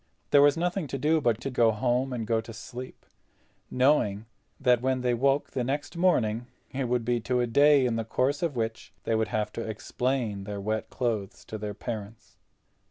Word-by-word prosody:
There 145 Hz, -, +7 dB
was 145 Hz, +2 st, +5 dB
nothing 175 Hz, 0 st, -1 dB
to 135 Hz, -, -4 dB
do 155 Hz, +3 st, +2 dB
but 120 Hz, -4 st, +1 dB
to 135 Hz, -, -3 dB
go 120 Hz, -2 st, +4 dB
home, 125 Hz, +4 st, 0 dB
and 120 Hz, -3 st, -3 dB
go 110 Hz, 0 st, +1 dB
to 115 Hz, +1 st, -10 dB
sleep, 125 Hz, +4 st, -9 dB, 0.6 s
knowing 125 Hz, -6 st, +2 dB, 0.3 s
that 125 Hz, -3 st, +3 dB
when 130 Hz, 0 st, 0 dB
they 125 Hz, -1 st, +1 dB
woke 135 Hz, +4 st, +1 dB
the 125 Hz, -, -1 dB
next 145 Hz, +5 st, -3 dB
morning 120 Hz, -10 st, +2 dB, 0.2 s
it 135 Hz, 0 st, -2 dB
would 120 Hz, -1 st, 0 dB
be 120 Hz, 0 st, +1 dB
to 125 Hz, +2 st, 0 dB
a 120 Hz, -, +2 dB
day 140 Hz, +3 st, +5 dB
in 115 Hz, -2 st, 0 dB
the 115 Hz, -, -1 dB
course 130 Hz, +5 st, 0 dB
of 165 Hz, -5 st, -1 dB
which 115 Hz, -1 st, -3 dB
they -, -, 0 dB
would 110 Hz, 0 st, +1 dB
have 105 Hz, 0 st, -2 dB
to -, -, -4 dB
explain 110 Hz, -1 st, -2 dB
their 105 Hz, -1 st, -5 dB
wet 110 Hz, +2 st, -2 dB
clothes 110 Hz, -6 st, -3 dB
to 110 Hz, -, -6 dB
their 105 Hz, -1 st, -5 dB
parents. 110 Hz, -1 st, -7 dB
120 Hz, 200 wpm, -28 LUFS, 110-135 Hz, 0.6 s, There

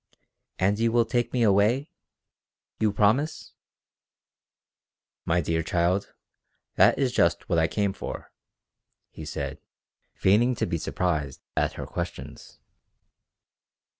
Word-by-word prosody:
"And 100 Hz, +3 st, +1 dB
you 115 Hz, 0 st, +2 dB
will 120 Hz, 0 st, +3 dB
take 120 Hz, +1 st, -1 dB
me 125 Hz, -2 st, +1 dB
away? 110 Hz, +7 st, +3 dB, 0.9 s
You 110 Hz, -1 st, +2 dB
promise?" 110 Hz, +10 st, +1 dB, 1.7 s
"My 85 Hz, +1 st, +2 dB
dear 80 Hz, +1 st, 0 dB
child, 85 Hz, +4 st, 0 dB, 0.6 s
that -, -, +5 dB
is 135 Hz, -3 st, +1 dB
just 85 Hz, -7 st, +1 dB
what 85 Hz, -, +2 dB
I 80 Hz, -, +3 dB
came 100 Hz, +2 st, -1 dB
for," -, -, -7 dB, 0.8 s
he 80 Hz, -, -9 dB
said, 70 Hz, -2 st, -5 dB, 0.6 s
feigning 115 Hz, +6 st, +3 dB
to -, -, -1 dB
be 85 Hz, -, -2 dB
surprised 75 Hz, -5 st, -2 dB
at -, -, +1 dB
her -, -, -6 dB
questions. -, -, -7 dB
100 Hz, 115 wpm, -26 LUFS, 85-115 Hz, 1.7 s, that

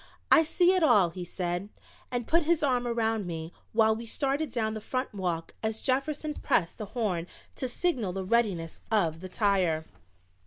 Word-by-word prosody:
"I -, -, +8 dB
see 350 Hz, +3 st, +3 dB
it 370 Hz, -, +2 dB
all," 210 Hz, -, +5 dB
he 180 Hz, +1 st, -6 dB
said, 175 Hz, +2 st, -3 dB, 0.4 s
and 245 Hz, -2 st, -2 dB
put 335 Hz, +7 st, +3 dB
his 325 Hz, 0 st, +1 dB
arm 250 Hz, -3 st, +2 dB
around 225 Hz, -4 st, 0 dB
me 165 Hz, -1 st, -5 dB, 0.2 s
while 220 Hz, 0 st, +4 dB
we 230 Hz, +1 st, -7 dB
started 280 Hz, +5 st, -1 dB
down 220 Hz, -3 st, -1 dB
the 215 Hz, -, -5 dB
front 255 Hz, +3 st, -3 dB
walk 175 Hz, -4 st, -3 dB
as 220 Hz, 0 st, -2 dB
Jefferson 290 Hz, +3 st, -1 dB
pressed 170 Hz, -, 0 dB
the 215 Hz, -, -3 dB
horn 180 Hz, -7 st, 0 dB, 0.3 s
to 260 Hz, -, -2 dB
signal 245 Hz, -, 0 dB
the 190 Hz, +1 st, -3 dB
readiness 195 Hz, -7 st, 0 dB
of 170 Hz, -7 st, +2 dB
the 185 Hz, +1 st, -8 dB
tire. 185 Hz, -6 st, +1 dB
220 Hz, 180 wpm, -29 LUFS, 180-260 Hz, 0.4 s, I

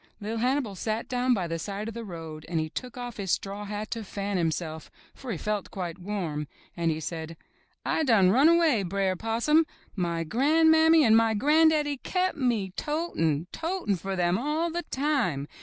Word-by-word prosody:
Li'r 220 Hz, +2 st, -3 dB
Hannibal 255 Hz, -2 st, 0 dB
sat 215 Hz, +4 st, -3 dB
down 250 Hz, 0 st, +1 dB
by 190 Hz, -4 st, -1 dB
the 165 Hz, 0 st, -3 dB
side 200 Hz, +4 st, -4 dB
of 225 Hz, -, -5 dB
the 230 Hz, +1 st, -6 dB
road 165 Hz, -5 st, -8 dB
and 170 Hz, -2 st, 0 dB
he 155 Hz, 0 st, -2 dB
took 250 Hz, +4 st, -6 dB
off 245 Hz, -2 st, -6 dB
his 195 Hz, -2 st, -4 dB
straw 200 Hz, +3 st, -2 dB
hat 210 Hz, +1 st, -5 dB
to 230 Hz, -2 st, -3 dB
fan 200 Hz, 0 st, -4 dB
himself, 160 Hz, -2 st, -2 dB, 0.2 s
for 260 Hz, -3 st, -7 dB
he 190 Hz, -, -2 dB
felt 210 Hz, +2 st, -2 dB
quite 180 Hz, -2 st, -5 dB
warm, 175 Hz, -6 st, -3 dB, 0.3 s
and 170 Hz, -1 st, 0 dB
he 155 Hz, -1 st, -1 dB
said: 160 Hz, 0 st, -6 dB, 0.5 s
'*I -, -, +1 dB
done 220 Hz, -10 st, +4 dB
run 270 Hz, +9 st, +6 dB
away, 330 Hz, -9 st, +4 dB
Br'er 190 Hz, 0 st, 0 dB
Possum. 230 Hz, -, +2 dB, 0.3 s
My 170 Hz, -3 st, -1 dB
gran'mammy 320 Hz, -, +5 dB
and 220 Hz, -1 st, +6 dB
my 225 Hz, -1 st, +4 dB
gran'daddy 300 Hz, +3 st, +3 dB
kep' 370 Hz, 0 st, 0 dB
me 235 Hz, -, 0 dB
to 320 Hz, +3 st, -2 dB
tin', 160 Hz, -1 st, +1 dB
totin' 330 Hz, -, -1 dB
for 190 Hz, +2 st, -4 dB
them 175 Hz, +1 st, +1 dB
all 310 Hz, +5 st, -1 dB
the 345 Hz, +1 st, -2 dB
time. 260 Hz, -, 0 dB
215 Hz, 190 wpm, -27 LUFS, 175-280 Hz, 0.5 s, run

